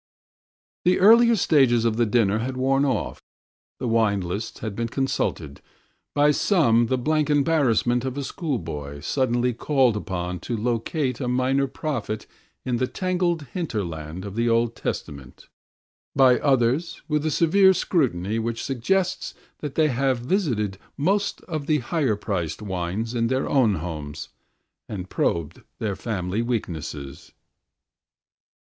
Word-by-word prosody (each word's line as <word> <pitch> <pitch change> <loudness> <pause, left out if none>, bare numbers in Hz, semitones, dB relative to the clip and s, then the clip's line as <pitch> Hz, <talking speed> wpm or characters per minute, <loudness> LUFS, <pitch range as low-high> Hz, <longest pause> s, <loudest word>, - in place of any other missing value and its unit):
"The 180 +1 +4
earlier 230 +4 +7
stages 135 - +3
of 115 -2 +2
the 120 0 +2
dinner 110 -2 +2
had 130 +3 -3
worn 135 +2 +2
off. 130 - -2 0.6
The 125 - -3
wine 110 -3 +2
lists 100 +5 -5
had 110 -3 -4
been 115 +1 -1
consulted, 115 - -2 0.5
by 145 +1 +5
some 150 - +3
with 120 -1 +2
the 130 - +2
blank 155 +4 +1
embarrassment 135 -5 +2
of 130 0 -4
a 140 - -2
schoolboy 80 - -4
suddenly 125 - +1
called 130 -1 +2
upon 90 -3 -3
to 115 +7 -4
locate 125 +5 -1
a 125 - -2
Minor 130 +2 +1
Prophet 125 -7 -4 0.4
in 125 -2 0
the 130 +1 0
tangled 180 -2 -1
hinterland 90 - -4
of 100 0 -7
the 115 +1 +1
Old 115 0 +2
Testament, 70 -3 -6 0.7
by 130 -2 +5
others 135 +4 +1
with 150 -1 +1
the 155 - 0
severe 190 +5 +5
scrutiny 115 - 0
which 115 0 -3
suggests 185 +9 -1 0.2
that 145 -3 -6
they 155 -1 +3
have 130 0 +1
visited 120 - -1 0.2
most 195 +7 0
of 155 -4 -5
the 155 - +3
higher 135 -3 0
priced 95 -3 -3
wines 95 +4 -3
in 115 -1 +1
their 130 +2 0
own 120 -7 +3
homes 75 -3 -6 0.6
and 95 -3 -6
probed 85 -3 -1 0.2
their 105 -3 -2
family 100 -1 -2
weaknesses." 80 - -4
120 Hz, 140 wpm, -24 LUFS, 105-145 Hz, 0.7 s, earlier